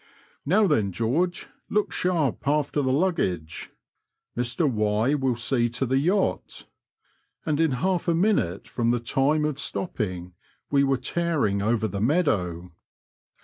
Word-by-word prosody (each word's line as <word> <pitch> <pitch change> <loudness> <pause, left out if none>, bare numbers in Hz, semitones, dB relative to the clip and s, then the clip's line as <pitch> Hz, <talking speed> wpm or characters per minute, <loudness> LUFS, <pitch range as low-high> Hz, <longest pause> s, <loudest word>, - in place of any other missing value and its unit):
" - - -33
Now, 205 +7 +4
then, 105 - +1
George; 140 - -1 0.2
look 210 0 0
sharp 160 -8 -1
after 145 0 +1
the 130 -2 0
luggage. 130 - -1 0.7
Mr 125 +6 0
Y 110 +1 +1
will 135 -4 0
see 120 0 +1
to 120 +3 -2
the 130 +2 +1
yacht; 185 +7 -1 0.4
" - - -43
and 155 -2 0
in 160 -4 +2
half 185 -2 0
a 170 - +3
minute 165 - +1
from 115 -1 -1
the 120 0 +2
time 135 +6 +1
of 150 -2 -2
stopping 95 - -4 0.4
we 140 -1 +4
were 135 -1 +2
tearing 155 - 0
over 110 +1 +1
the 100 0 -4
meadow. 95 - 0
135 Hz, 145 wpm, -25 LUFS, 110-160 Hz, 0.7 s, Now